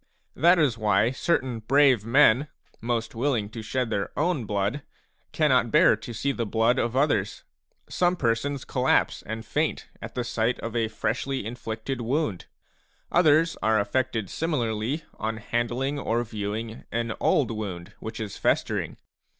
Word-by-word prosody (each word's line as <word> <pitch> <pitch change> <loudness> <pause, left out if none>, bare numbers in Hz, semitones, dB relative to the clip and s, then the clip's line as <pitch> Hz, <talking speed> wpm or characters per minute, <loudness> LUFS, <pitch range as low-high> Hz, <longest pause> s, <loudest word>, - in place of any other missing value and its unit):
That 175 +3 +5
is 135 -8 +2
why 105 +2 +3
certain 130 -4 0
brave 130 -1 +4
men, 130 +3 +4 0.3
most 115 0 -2
willing 115 -4 0
to 110 +1 -7
shed 125 +1 -2
their 100 -2 -1
own 155 -5 0
blood, 105 +7 -1 0.5
cannot - - +3
bear - - +5
to - - -9
see 115 +5 -1
the 120 -3 -2
blood 115 +4 +2
of 120 +1 -1
others. 120 -8 +1 0.4
Some 180 0 +1
persons 135 0 -1
collapse 130 -1 +1
and 110 +1 -6
faint 150 +9 -1
at - - -8
the 125 - -1
sight 115 +1 -1
of 115 0 -5
a 115 -1 +1
freshly 115 +3 -2
inflicted 115 +2 -5
wound; 120 - -1 0.6
others 165 -1 +4
are 110 0 +3
afFected 115 -1 -1
similarly 130 -2 -1 0.2
on 110 +1 -2
handling 120 +5 -2
or 120 -2 0
viewing 110 +1 -5
an 115 0 -1
old 135 -6 +2
wound 100 -3 -5
which 110 0 -7
is 105 -3 -5
festering. - - 0
115 Hz, 150 wpm, -26 LUFS, 110-135 Hz, 0.6 s, That